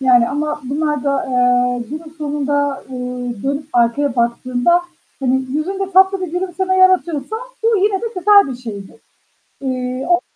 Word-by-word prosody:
Yani, 245 -3 +4
ama 300 +1 -2
bunlar 295 +1 -1
da, 275 -1 0
eee, 245 -1 +2
günün 310 +1 -8
sonunda, 285 -1 -1
ııı, 250 -3 -5
dönüp 280 +2 -2
arkaya 240 +3 +1
baktığında, 245 +7 +2 0.4
hani, 265 0 +1
yüzünde 385 +6 -2
tatlı 380 +1 +5
bir 360 -3 -4
gülümseme 375 +1 -1
yaratıyorsa, 370 -2 +2 0.3
bu 455 -1 +3
yine 395 0 +1
de 465 - -3
güzel 405 -2 +6
bir 255 - -5
şeydir. 205 -6 -8 0.7
Iıı, 255 0 -3
o, 350 0 +4
285 Hz, 145 wpm, -18 LUFS, 250-355 Hz, 0.7 s, güzel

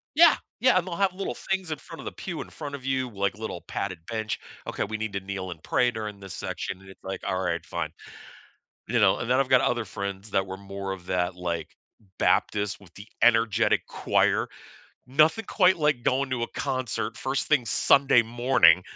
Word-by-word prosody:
Yeah, 335 0 +7 0.2
yeah, 255 -4 +5
and 185 0 0
they'll 170 - -3
have 195 -1 +2
little 195 +1 -4
things 190 -3 -2
in 155 - -2
front 165 +3 -11
of - - -9
the - - -4
pew 175 -4 -5
in - - -9
front 145 -2 -7
of 130 -2 -10
you, 130 -2 0
like 100 -1 -1
little 110 -6 -5
padded 90 -4 -3
bench, 110 -2 -2 0.3
okay, - - -2
we 110 +2 -5
need 110 -1 -3
to 100 - -1
kneel 95 -1 -5
and 80 - -9
pray 125 -1 +2
during 105 -3 -5
this 95 -2 -8
section, 95 -1 -4
and 95 - -15
it's 95 - -15
like, 95 0 -5
"Alright, 90 -2 -1
fine." - - -3 1.0
You 120 +1 +1
know? 95 -2 +5
And 115 - -4
then 130 +2 +4
I've 135 - +1
got 130 -1 +5
other 120 -2 +1
friends 100 +1 -5
that 95 0 +1
were 95 0 -6
more 100 0 -5
of 90 -2 -8
that, 90 0 0
like, 85 -3 -4 0.4
Baptist 105 0 +1
with 90 -4 -18
the 100 - -11 0.2
energetic 115 -3 +4
choir. - - +1 0.6
Nothing 155 - +3
quite 185 -2 +4
like 150 -5 +2
going 130 +2 +1
to 125 -2 -1
a 115 - -1
concert 130 -4 -2
first 135 +1 -1
thing 145 -5 +3
Sunday 135 -4 +5
morning, 115 -7 +4
110 Hz, 205 wpm, -26 LUFS, 95-135 Hz, 1.0 s, Yeah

